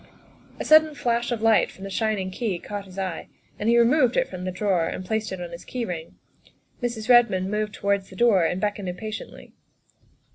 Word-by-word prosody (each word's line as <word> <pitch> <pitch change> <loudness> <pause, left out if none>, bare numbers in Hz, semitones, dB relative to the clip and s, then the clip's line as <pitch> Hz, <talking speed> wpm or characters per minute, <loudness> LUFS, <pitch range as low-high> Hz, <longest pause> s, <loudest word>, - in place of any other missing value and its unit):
A - - -3
sudden 310 -1 +6
flash 240 -2 -1
of 225 -2 -2
light 225 -1 +4
from 190 - -13
the 195 - -6
shining 205 -3 -1
key 205 -3 -2
caught 205 +3 -6
his 190 0 -14
eye, 185 -4 -4 0.3
and 210 - 0
he 235 - +5
removed 245 +1 +4
it - - +2
from 185 -1 -7
the 185 - -2
drawer 185 -3 0
and 185 - -5
placed 220 +2 -2
it 190 - -5
on 175 -1 -6
his 170 - -9
key 245 -2 -4
ring, 170 -4 -6 0.6
while 245 - 0
Mrs. 220 -2 -7
Redmond 230 -6 +4
moved 210 0 -2
towards 200 -1 -1
the 190 - -12
door 205 -4 +4
and 180 +3 0
beckoned 205 -2 -2
impatiently. 215 +4 -7
205 Hz, 210 wpm, -24 LUFS, 185-235 Hz, 0.6 s, sudden